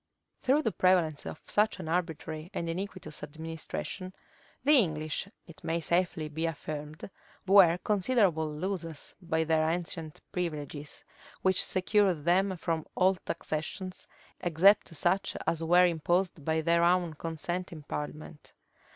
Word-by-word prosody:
[*] - - -50
Through 280 +4 +3
the 225 - +1
prevalence 175 -6 +2
of 155 - -8
such 210 +1 +1
an - - -6
arbitrary 160 -1 -3
and 170 - -2
iniquitous 180 -2 -5
administration, 165 +4 -6 0.5
the 290 - +4
English, 155 -3 -1 0.2
it 165 - -15
may 165 +1 0
safely 170 -1 0
be 160 +2 -2
affirmed, 155 -1 -6 0.4
were 190 -3 +7
considerable 195 -6 +2
losers 165 -1 -4
by 160 -2 0
their 160 0 +2
ancient 165 -2 -3
privileges, 150 -4 -4 0.4
which 190 -1 +3
secured 185 -4 +2
them 185 +2 +3
from 165 -1 -2
all 190 +1 +4
taxations, 180 +1 -5 0.3
except 180 +5 +4
such 175 +6 +1
as 165 -1 0
were 175 +2 +6
imposed 175 0 0
by 160 +2 +1
their 170 +1 +3
own 175 -1 +3
consent 165 +3 -4
in 155 -3 -9
parliament. 150 +1 -7
170 Hz, 135 wpm, -30 LUFS, 155-185 Hz, 0.5 s, were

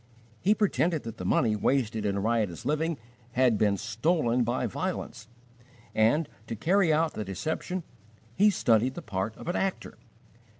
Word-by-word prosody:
He 205 +4 +3
pretended 175 -6 +1
that 115 0 -7
the 90 - -6
money 110 +3 +2
wasted 110 -2 0
in 100 0 0
riotous 110 -2 -1
living 155 +3 0 0.4
had 125 -2 +4
been 100 -2 +3
stolen 120 - +1
by 120 +2 -1
violence, 110 +1 -4 0.7
and, 125 +8 +3 0.2
to 115 - -4
carry 175 - +3
out 155 +1 +2
the 110 - -4
deception 160 - -3 0.5
he 205 - +5
studied 125 - +2
the - - -7
part 100 +1 -3
of - - -10
an 175 - -1
actor. 195 -1 -2
120 Hz, 155 wpm, -28 LUFS, 110-160 Hz, 0.7 s, he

